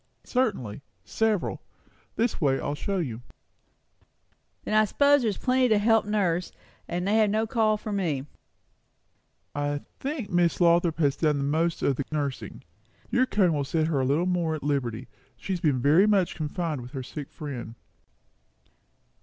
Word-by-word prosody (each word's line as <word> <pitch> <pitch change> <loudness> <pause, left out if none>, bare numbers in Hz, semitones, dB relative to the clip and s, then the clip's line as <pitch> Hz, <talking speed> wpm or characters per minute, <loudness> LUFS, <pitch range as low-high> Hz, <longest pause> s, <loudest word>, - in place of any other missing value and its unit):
"Certainly. 195 - -1 0.2
Several. 220 -4 0 0.5
This 230 -3 0
way 135 -3 +2
I - - -6
will 145 - -1
show 195 +7 -3
you." 125 -10 -3 1.4
"Then - - -3
I 215 0 +6
s'pose 285 +6 +4
there's 220 -4 -1
plenty 255 -1 +2
to 215 - +4
help 225 +1 +3
nurse, 185 -5 0 0.4
and 180 +2 -2
they 210 +2 +3
have 215 -2 +4
no 215 +2 +1
call 220 -2 +2
for 215 0 -6
me?" 160 -9 -1 1.3
"I 145 0 -2 0.2
think 270 -7 -4
Miss 175 -1 +2
Lothrop 170 -1 +3
has 145 -4 +2
done 150 -3 +2
the 140 - -1
most 160 +4 0
of 135 - +1
the 140 - -2
nursing. 140 -8 -4 0.5
Your 255 +1 +3
coming 190 -7 +2
will 145 -2 0
set 155 +3 0
her 155 -4 0
a - - +1
little 145 +7 +1
more 175 -3 0
at 155 - -7
liberty. 130 -4 -2 0.3
She 195 - -4
has 180 - -2
been 145 -6 +1
very 155 - +5
much 195 -4 +2
confined 155 -2 -3
with 125 +3 -11
her 135 -2 -4
sick 145 +2 -7
friend." 125 -7 -7
170 Hz, 170 wpm, -26 LUFS, 145-210 Hz, 1.4 s, I